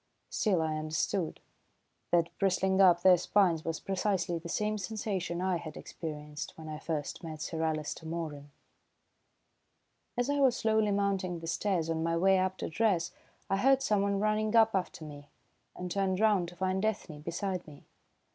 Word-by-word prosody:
Still, 185 -7 +2
I 155 -1 -1
understood. 160 +3 -1 0.7
That 170 -1 +2
bristling 190 0 +2
up 175 -2 +6
their 185 -1 +7
spines 175 -3 +2
was 165 -1 -3
precisely 190 -3 -1
the 170 +1 -8
same 210 +3 -1
sensation 190 -4 -3
I 185 -1 +1
had 160 -3 -8
experienced 150 -2 -7
when 160 -1 -9
I 155 -1 -5
first 155 0 -4
met 160 -2 -6
Sir 160 +1 -3
Alister 160 0 -2
Moeran. 155 -3 -5 1.7
As 245 0 +1
I 285 0 +1
was 265 -3 +4
slowly 220 -1 +2
mounting 195 -3 0
the 165 - -8
stairs 170 0 0
on 165 -1 -1
my 165 0 +1
way 190 +2 +4
up 185 0 0
to - - -3
dress, 185 -1 +1 0.4
I 195 - +1
heard 270 +5 +4
someone 200 -4 +2
running 215 +1 +1
up 225 -1 +6
after 180 -4 -2
me, 145 -1 -10 0.5
and 180 0 -5
turned 190 -1 0
round 210 -5 +3
to 175 - -14
find 190 +1 -1
Ethne 200 -8 -2
beside 175 +3 -3
me. 145 -2 -13
180 Hz, 165 wpm, -31 LUFS, 160-200 Hz, 1.7 s, their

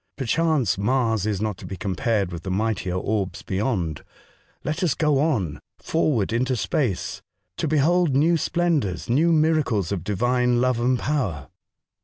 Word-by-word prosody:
Perchance, 140 - +1
Mars 115 -2 +1
is 105 -2 -1
not 105 -3 -2
to - - -10
be 95 - -6
compared 100 +1 -1
with 85 -1 -6
the 95 - -6
mightier 95 -2 -1
orbs 100 0 -2
beyond. 95 - -2 0.6
Let 155 +2 -2
us 170 -6 +1
go 150 -3 +2
on 105 - 0
— - - -62
forward 125 -10 0
into 130 +2 +1
space 100 0 -1 0.4
to - - -1
behold 155 +1 +2
new 160 +5 +4
splendours, 155 - 0
new 160 +7 +3
miracles 155 - +2
of 95 -5 -2
Divine 120 +4 +1
love 125 -1 +1
and 125 +1 +2
power." 115 - -2
120 Hz, 155 wpm, -24 LUFS, 95-150 Hz, 0.6 s, new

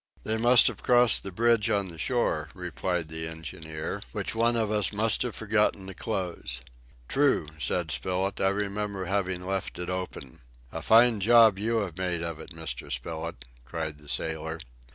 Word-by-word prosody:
"They 110 - -1
must 120 +2 +6
have - - -1
crossed 120 -2 +4
the 95 - -6
bridge 115 +2 +3
on 100 -2 0
the 80 -1 -8
shore," 80 -9 0
replied 90 -2 -3
the 80 +1 -4
engineer, 80 -1 -6
"which - - -3
one 115 +1 +3
of 110 -2 0
us 105 -4 +2
must 110 +1 +2
have 120 -3 -2
forgotten 105 -2 +1
to 95 - -8
close." 95 -4 -3 0.4
"True," 140 - +2
said 80 +4 -1
Spilett, 90 +8 -1
"I 95 - +4
remember 100 -1 -2
having 95 -1 -1
left 95 0 -3
it 90 +1 -4
open." 90 -8 -6 0.3
"A - - -5
fine 115 0 +6
job 110 -1 +6
you 115 +2 +1
have 95 -3 -5
made 90 -2 -1
of 85 -2 -4
it, - - -10
Mr. 80 -7 -6
Spilett," 80 +1 -4 0.2
cried 80 +3 -5
the 75 -1 -14
sailor. 80 +1 -2
95 Hz, 175 wpm, -27 LUFS, 80-110 Hz, 0.4 s, must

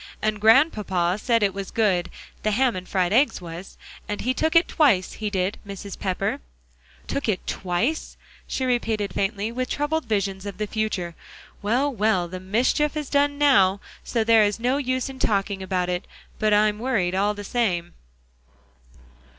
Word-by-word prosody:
And 215 -1 -1
Grandpapa 210 - +3
said 230 -3 +2
it 200 -2 +2
was 195 -1 -5
good 195 -6 +1 0.3
the 215 - 0
ham 245 +2 +2
and 185 0 -7
fried 185 -1 +1
eggs 270 +6 +3
was 175 +1 -9 0.3
and 210 - -3
he 255 +3 0
took 315 +5 0
it 330 - +6
twice; 230 - +2
he 215 -1 -3
did, 190 0 -1
Mrs. 200 -1 -8
Pepper." 185 -2 -1 0.7
"Took 280 -4 -2
it 195 - -1
twice?" 200 - -2 0.3
she 260 - -2
repeated, 225 -5 0
faintly, 200 +2 -1
with 255 +1 -3
troubled 295 +1 -1
visions 200 -3 -2
of 200 -2 -6
the 210 - -1
future. 205 -5 -2 0.5
"Well, 250 +7 +1
well, 210 -5 +1
the 185 +2 -7
mischief 250 +10 +1
is 300 -3 -4
done 285 0 +2
now, 205 -10 +4 0.2
so 230 -2 0
there 225 0 +5
is 205 +1 0
no 250 +4 +1
use 255 -2 -1
in 265 -1 -9
talking 200 -3 0
about 185 -1 -1
it; 180 0 -3 0.3
but 215 -1 +2
I'm 210 0 +3
worried, 215 -8 0
all 205 +2 +1
the 205 - -7
same." 190 -7 -1
210 Hz, 170 wpm, -24 LUFS, 190-255 Hz, 0.7 s, it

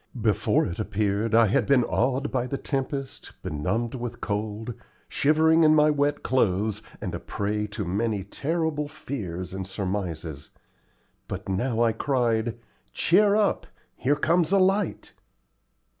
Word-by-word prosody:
Before 105 -2 +2
it 85 - -5
appeared 105 +1 0
I 115 0 +7
had 105 - +1
been 135 -3 +5
awed 130 +4 0
by 125 -1 -1
the 140 - -3
tempest, 135 -1 -4
benumbed 95 +11 -2
with 120 -2 -5
cold, 105 +2 -3 0.3
shivering 160 +2 +3
in 155 0 +6
my 150 0 +5
wet 145 0 0
clothes, 105 -3 +1 0.2
and - - -4
a - - -3
prey 105 +1 -2
to 105 0 -5
many 100 +2 -1
terrible 150 - -2
fears 95 -12 -6
and 95 -1 -5
surmises; 90 -7 -4 0.8
but - - -6
now 115 +5 0
I 115 - +3
cried, 115 -2 0 0.4
"Cheer 200 +4 +4
up; 210 -1 +1 0.3
here 140 +3 +1
comes 165 +3 +2
a 200 - +5
light." 195 +2 +1
115 Hz, 140 wpm, -26 LUFS, 100-145 Hz, 0.8 s, I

